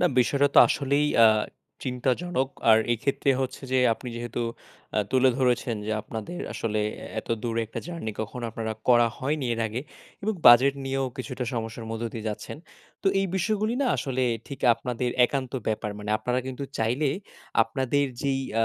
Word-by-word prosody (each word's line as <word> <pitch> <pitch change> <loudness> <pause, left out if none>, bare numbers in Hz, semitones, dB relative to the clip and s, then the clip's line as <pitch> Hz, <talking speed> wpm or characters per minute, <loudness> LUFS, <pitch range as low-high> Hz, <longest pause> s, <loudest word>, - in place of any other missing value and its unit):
না - - +5
বিষয়টাতো 140 +3 +4
আসলেই 140 +1 +1 0.2
আ - - +10 0.6
চিন্তাজনক 130 +3 0 0.2
আর 110 - +8
এক্ষেত্রে 135 +3 0
হচ্ছে 130 +1 -3
যে 130 - +4 0.2
আপনি 125 - -8
যেহেতু 120 0 -3 0.5
আ - - +4
তুলে 130 0 +4
ধরেছেন 125 -2 +1
যে 110 - -1
আপনাদের 115 - -6
আসলে 110 -1 -1 0.2
এ - - -7
এত - - -20
দূরে 115 -1 -1
একটা 110 - -6
জার্নি 165 -11 -5
কখনো 120 +3 -5
আপনারা 110 -1 -3 0.2
করা 120 -1 +6
হয়নি 140 0 -1
এর 115 - -4
আগে 115 +4 -3 0.4
এবং 215 +1 0
বাজেট 130 +4 +8
নিয়েও 135 0 -1
কিছুটা 130 -1 -4
সমস্যার 115 0 -4
মধ্য 115 +1 -3
দিয়ে 110 -1 -6
যাচ্ছেন। 105 +6 -6 0.5
তো - - -3
এই 195 - +1
বিষয়গুলি 215 +4 0
না 270 - +1
আসলে 130 -1 -1 0.3
ঠিক 140 - -7
আপনাদের 125 +1 -2
একান্ত 130 -1 -2 0.2
ব্যাপার 105 -1 -1
মানে 105 0 -5
আপনারা 125 +3 -1
কিন্তু 130 +2 -5
চাইলে 125 +6 +1 0.5
আপনাদের 130 +5 0 0.2
যেই 135 -1 +1 0.2
আ - - +5
125 Hz, 165 wpm, -26 LUFS, 115-140 Hz, 0.6 s, আ